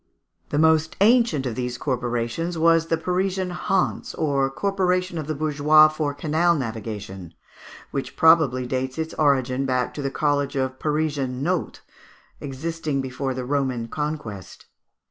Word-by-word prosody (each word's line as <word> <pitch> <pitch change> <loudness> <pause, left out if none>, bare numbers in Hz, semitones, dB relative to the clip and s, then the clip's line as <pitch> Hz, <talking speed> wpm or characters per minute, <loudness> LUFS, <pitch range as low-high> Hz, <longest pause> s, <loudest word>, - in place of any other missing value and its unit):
The - - -1
most 160 0 +3
ancient 220 - +4
of 125 - -2
these 125 +1 -3
corporations 125 +6 -2
was 165 0 +3
the 165 - +1
Parisian 185 +2 -1
Hanse, 190 +2 -1
or 140 -3 +1
corporation 185 +1 0
of 150 - -5
the 155 - -2
bourgeois 155 +1 +5
for 155 -2 -3
canal 160 +4 +2
navigation, 105 - -6 0.6
which 135 -2 -4
probably 155 -6 +4
dates 130 +1 -3
its 160 0 -3
origin 135 -2 +1
back 125 -1 0
to 150 - -5
the 135 - -1
college 145 0 0
of 130 -1 -2
Parisian 145 -4 -1
Nautes, 180 +2 -2 0.6
existing 150 +1 -3
before 130 0 -3
the 125 -1 -4
Roman 130 -4 -1
conquest. 150 - -5
145 Hz, 140 wpm, -23 LUFS, 130-160 Hz, 0.6 s, bourgeois